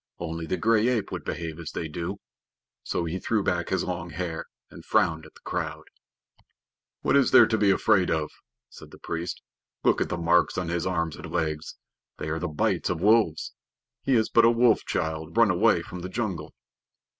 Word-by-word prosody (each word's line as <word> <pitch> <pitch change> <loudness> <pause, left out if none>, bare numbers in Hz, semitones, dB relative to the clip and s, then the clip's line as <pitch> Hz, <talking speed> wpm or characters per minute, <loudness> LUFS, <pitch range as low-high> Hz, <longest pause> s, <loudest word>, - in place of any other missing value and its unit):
"Only 80 -1 -5
the 95 - -1
gray 115 0 +3
ape 120 -5 0
would - - -5
behave 80 -1 -5
as 85 - -6
they 80 - -3
do." 85 +6 -5 0.6
So 85 - -2
he 85 +3 -3
threw 110 +2 0
back 85 -2 -1
his 95 - 0
long 90 -1 -4
hair 85 0 -4 0.3
and - - -12
frowned 80 -1 +1
at - - -21
the - - -18
crowd. - - -3 1.2
"What - - +2
is 140 -2 +5
there - - +8
to 110 - 0
be 105 -2 +3
afraid 95 -1 +3
of?" 75 -1 -1 0.4
said - - -13
the - - -14
priest. 85 +1 -5 0.4
"Look - - +3
at - - 0
the - - -2
marks 85 +1 +2
on 90 -2 -2
his 85 +1 -1
arms 85 -3 -1
and - - -9
legs. 80 -3 -2 0.4
They 75 - -4
are 80 +1 -2
the 90 - -2
bites 75 -2 0
of 90 - -1
wolves. 105 -5 +2 0.5
He 135 - +2
is 110 -2 +3
but 115 - +4
a 115 - +7
wolf 115 -1 +4
child 80 +3 -3
run 115 -4 +6
away 90 - +3
from 90 - -8
the 90 +1 -6
jungle." 100 -4 -4
85 Hz, 200 wpm, -26 LUFS, 80-105 Hz, 1.2 s, there